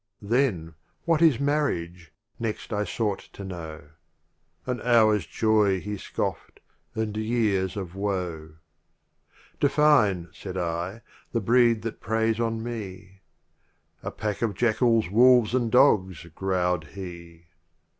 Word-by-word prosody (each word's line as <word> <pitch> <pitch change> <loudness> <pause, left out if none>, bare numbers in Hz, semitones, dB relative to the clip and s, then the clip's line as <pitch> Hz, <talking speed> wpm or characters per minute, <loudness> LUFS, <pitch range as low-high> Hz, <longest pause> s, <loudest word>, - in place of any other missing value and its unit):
Then, 100 -8 0 0.3
"What 165 -1 +2
is 155 -7 +5
Marriage?" 90 - -1 0.3
next 115 -1 -4
I 105 0 0
sought 105 +1 -2
to 100 - -9
know. 80 -5 -7 0.8
"An 125 -1 -3
hour* 115 -3 +4
s 105 - -4
joy" 105 -4 +2
he 105 +3 -5
scoffed, - - -4 0.2
" - - -43
and 110 -2 -2
years 110 -4 0
of 90 -3 -5
woe.* 90 -6 -4 0.5
* - - -32
"Define, 135 - +3
said 95 -1 -7
I, 90 +5 -3 0.3
"the 115 - +1
breed 115 +1 +3
that 115 - -5
prey 110 +3 +1
on 115 0 -2
me. 95 -5 -7 0.8
"A - - -4
pack 105 -2 -4
of 110 -4 0
jackals, 115 0 +2
wolves 120 0 +5
and 120 -3 0
dogs! 95 - +3
growled 90 -3 -1
he. 85 -3 -9
105 Hz, 130 wpm, -26 LUFS, 90-115 Hz, 0.8 s, is